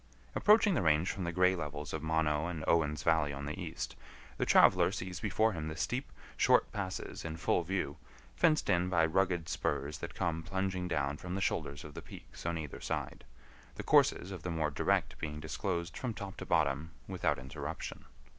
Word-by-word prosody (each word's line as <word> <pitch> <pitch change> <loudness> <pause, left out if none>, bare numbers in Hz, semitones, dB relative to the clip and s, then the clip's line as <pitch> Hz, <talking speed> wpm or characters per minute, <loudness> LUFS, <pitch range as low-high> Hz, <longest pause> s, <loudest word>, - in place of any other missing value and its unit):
Approaching 210 -1 +5
the 150 - +1
range 80 +1 +3
from 95 -3 -4
the 85 - -1
gray 90 +2 +4
levels 75 -3 -5
of 80 - -2
Mono 80 0 +1
and 85 -3 -4
Owen's 75 -4 +2
Valley 80 -3 +3
on 70 0 -5
the 75 +6 -5
east, 80 -2 -5 0.4
the - - 0
traveler - - +6
sees 90 -1 -5
before 110 +1 +2
him 80 -3 -4
the 80 - -4
steep, 125 - -2 0.2
short - - +4
passes 95 -3 -4
in 80 0 -5
full 85 - +2
view, 85 -4 -2 0.4
fenced 155 -2 +3
in 90 -1 +2
by 85 -3 +4
rugged 90 0 +1
spurs 70 -2 -2
that - - -6
come 80 -1 -1
plunging 95 +1 -2
down 70 -4 -1
from 90 +3 -5
the - - -1
shoulders 70 -6 -1
of 75 - -10
the - - -7
peaks - - -10
on 85 -1 0
either 75 -4 -6
side, - - -4 0.5
the - - -5
courses 95 - +4
of 95 -4 -6
the 90 - -4
more 80 -3 0
direct - - 0
being 75 -1 -4
disclosed 85 +3 -3
from 125 -4 -3
top 100 -1 -6
to 95 - -7
bottom 80 -2 +1 0.2
without - - 0
interruption. 65 0 -6
80 Hz, 195 wpm, -33 LUFS, 75-95 Hz, 0.5 s, traveler